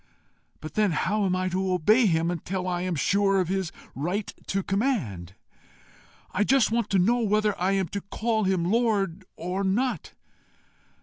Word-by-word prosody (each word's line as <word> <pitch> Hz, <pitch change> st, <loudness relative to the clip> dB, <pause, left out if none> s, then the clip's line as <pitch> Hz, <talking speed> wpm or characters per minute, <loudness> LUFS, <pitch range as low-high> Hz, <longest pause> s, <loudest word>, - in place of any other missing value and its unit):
But 155 Hz, -1 st, -8 dB
then 210 Hz, -5 st, +2 dB
how 205 Hz, +6 st, 0 dB
am 185 Hz, -1 st, +1 dB
I 185 Hz, 0 st, -1 dB
to 185 Hz, +1 st, -1 dB
obey 215 Hz, +7 st, +4 dB
him 165 Hz, -1 st, +1 dB
until 180 Hz, +2 st, -3 dB
I 175 Hz, -1 st, -1 dB
am 180 Hz, -1 st, -1 dB
sure 195 Hz, +5 st, +2 dB
of 180 Hz, -2 st, 0 dB
his 190 Hz, -3 st, -1 dB, 0.2 s
right 180 Hz, +9 st, -3 dB
to 195 Hz, 0 st, -1 dB
command? 145 Hz, -, -2 dB, 1.0 s
I 205 Hz, -, +1 dB
just 255 Hz, -1 st, +3 dB
want 230 Hz, -2 st, 0 dB
to 195 Hz, -, +2 dB
know 225 Hz, +7 st, +3 dB
whether 210 Hz, -1 st, +2 dB
I 190 Hz, +2 st, +2 dB
am 190 Hz, -2 st, +1 dB
to 200 Hz, -, -4 dB
call 220 Hz, +2 st, -1 dB
him 185 Hz, -3 st, +1 dB
Lord 200 Hz, -3 st, 0 dB
or 180 Hz, +4 st, -3 dB
not. 210 Hz, -, -1 dB
195 Hz, 170 wpm, -26 LUFS, 180-215 Hz, 1.0 s, obey